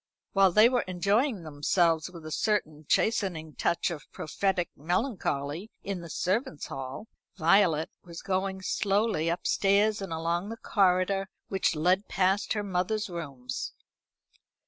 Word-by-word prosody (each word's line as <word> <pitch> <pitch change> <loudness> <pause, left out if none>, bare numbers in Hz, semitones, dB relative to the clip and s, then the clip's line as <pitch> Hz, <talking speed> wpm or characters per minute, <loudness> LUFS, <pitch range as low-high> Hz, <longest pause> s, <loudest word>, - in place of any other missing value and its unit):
While 195 -2 +5
they 215 +5 +7
were 245 0 +2
enjoying 200 - +1
themselves, 160 +2 +1
with 170 -3 -11
a 155 - -6
certain 155 -7 -1
chastening 175 -8 +1
touch 170 - 0
of 155 -3 -8
prophetic 180 +2 -1
melancholy, 175 - -2
in 195 -3 -3
the 170 - -9
servants' 185 - -1
hall, 135 +10 -6 0.3
Violet 165 -2 +3
was 170 -1 -9
going 190 0 -1
slowly 200 -5 +1
upstairs 200 +4 +2
and 195 -3 -5
along 170 +4 -1
the 225 - -6
corridor 195 -1 +2 0.2
which 190 -3 +1
led 180 +6 +2
past 190 +2 +1
her 210 -1 -2
mother's 195 +2 -1
rooms. 140 -7 -5
185 Hz, 130 wpm, -28 LUFS, 160-200 Hz, 0.3 s, they